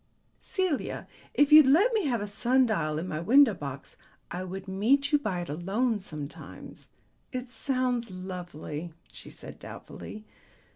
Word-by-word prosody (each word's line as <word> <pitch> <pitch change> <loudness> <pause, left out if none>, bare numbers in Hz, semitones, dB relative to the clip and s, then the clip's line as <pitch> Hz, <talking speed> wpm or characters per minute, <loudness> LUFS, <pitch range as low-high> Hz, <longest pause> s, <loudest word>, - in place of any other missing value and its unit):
Celia, 370 -7 -2 0.3
if 290 0 +4
you'd 305 -2 +10
let 380 - +5
me 420 -8 +1
have 240 -5 0
a 205 - -3
sun 250 +5 +3
dial 155 -9 0
in 165 +4 -3
my 155 - -3
window 240 - +6
box, 140 -5 -7 0.3
I 180 +2 -3
would 190 +1 -6
meet 255 +10 +2
you 295 - +5
by 190 -10 -2
it 175 - -6
alone 205 - 0
sometimes." 155 -6 -9 0.4
"It 250 -2 -5
sounds 250 -1 -1
lovely," 175 -4 -6 0.2
she - - -9
said - - -11
doubtfully. 215 - -9
215 Hz, 150 wpm, -28 LUFS, 175-265 Hz, 0.4 s, you'd